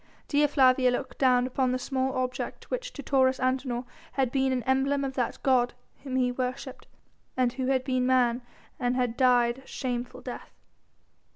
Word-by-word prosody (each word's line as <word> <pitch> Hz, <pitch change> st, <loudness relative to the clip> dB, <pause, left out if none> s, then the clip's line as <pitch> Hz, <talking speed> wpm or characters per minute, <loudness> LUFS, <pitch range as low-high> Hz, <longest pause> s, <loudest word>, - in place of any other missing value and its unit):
Dea 295 Hz, 0 st, +3 dB
Flavia 260 Hz, -3 st, +4 dB
looked 255 Hz, +1 st, -3 dB
down 250 Hz, -2 st, +4 dB
upon 255 Hz, 0 st, 0 dB
the 255 Hz, -, 0 dB
small 260 Hz, +1 st, -2 dB
object 255 Hz, 0 st, -4 dB
which -, -, -3 dB
to 285 Hz, -, -8 dB
Taurus 260 Hz, -1 st, +3 dB
Antinor 255 Hz, -1 st, -1 dB, 0.3 s
had 265 Hz, -3 st, 0 dB
been 265 Hz, 0 st, +1 dB
an 250 Hz, -2 st, -1 dB
emblem 270 Hz, +3 st, +1 dB
of 270 Hz, -1 st, -3 dB
that 250 Hz, -3 st, -2 dB
god 245 Hz, -2 st, +2 dB, 0.3 s
whom 265 Hz, -2 st, -5 dB
he 250 Hz, -1 st, +2 dB
worshipped 255 Hz, +1 st, -5 dB, 0.5 s
and 250 Hz, -2 st, +2 dB
who 260 Hz, 0 st, -3 dB
had 260 Hz, -1 st, +1 dB
been 255 Hz, -1 st, 0 dB
man 250 Hz, -1 st, +3 dB, 0.4 s
and 245 Hz, -1 st, 0 dB
had 245 Hz, -2 st, 0 dB
died 245 Hz, -1 st, +3 dB
a 265 Hz, -, -19 dB
shameful 245 Hz, -2 st, -4 dB
death. -, -, -8 dB
255 Hz, 175 wpm, -27 LUFS, 250-265 Hz, 0.5 s, Flavia